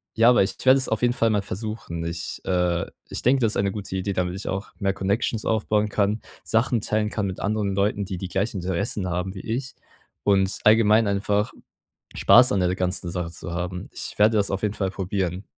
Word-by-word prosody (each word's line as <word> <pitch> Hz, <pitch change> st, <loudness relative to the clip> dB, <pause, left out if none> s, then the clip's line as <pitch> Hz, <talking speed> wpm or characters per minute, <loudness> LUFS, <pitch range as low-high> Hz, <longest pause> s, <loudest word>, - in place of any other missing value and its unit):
ja, 115 Hz, +1 st, +6 dB
aber 125 Hz, -, +5 dB
ich 95 Hz, -, -2 dB
werde 130 Hz, +1 st, +7 dB
es 135 Hz, -, -1 dB
auf 110 Hz, -, -1 dB
jeden 120 Hz, 0 st, +3 dB
Fall 115 Hz, -2 st, +2 dB
mal 105 Hz, -2 st, +1 dB
versuchen. 100 Hz, -4 st, -5 dB
Ich, 85 Hz, 0 st, -5 dB
äh 90 Hz, -2 st, +1 dB, 0.2 s
ich -, -, -5 dB
denke, 130 Hz, +2 st, +3 dB
das 110 Hz, -2 st, +2 dB
ist -, -, -2 dB
eine 100 Hz, -1 st, +1 dB
gute 100 Hz, -2 st, -6 dB
Idee, 95 Hz, +1 st, -2 dB
damit 90 Hz, -1 st, -1 dB
ich 95 Hz, -, -7 dB
auch 95 Hz, +2 st, -3 dB
mehr 100 Hz, -1 st, +1 dB
Connections 100 Hz, +3 st, -1 dB
aufbauen 105 Hz, -1 st, +1 dB
kann, 105 Hz, +1 st, 0 dB, 0.2 s
Sachen 115 Hz, 0 st, +1 dB
teilen 105 Hz, 0 st, 0 dB
kann 105 Hz, -2 st, -2 dB
mit 95 Hz, -1 st, -4 dB
anderen 105 Hz, -1 st, -1 dB
Leuten, 100 Hz, +1 st, +1 dB
die 95 Hz, -1 st, -5 dB
die 95 Hz, -, -5 dB
gleichen 95 Hz, +1 st, -2 dB
Interessen 95 Hz, +2 st, -2 dB
haben 90 Hz, +2 st, -2 dB
wie 95 Hz, -, -8 dB
ich, 130 Hz, +3 st, -4 dB, 0.5 s
und 95 Hz, -1 st, +2 dB
allgemein 110 Hz, 0 st, +5 dB
einfach 100 Hz, +1 st, 0 dB, 0.6 s
Spaß 125 Hz, +1 st, +6 dB
an 100 Hz, -, +2 dB
der 90 Hz, 0 st, +1 dB
ganzen 90 Hz, -1 st, -2 dB
Sache 85 Hz, -2 st, -3 dB
zu 85 Hz, +1 st, -8 dB
haben. 90 Hz, +1 st, -4 dB
Ich -, -, -7 dB
werde 110 Hz, +1 st, +5 dB
das 100 Hz, -, +1 dB
auf 95 Hz, 0 st, -2 dB
jeden 105 Hz, 0 st, 0 dB
Fall 95 Hz, -2 st, -1 dB
probieren. 95 Hz, -1 st, -3 dB
100 Hz, 215 wpm, -24 LUFS, 95-110 Hz, 0.6 s, werde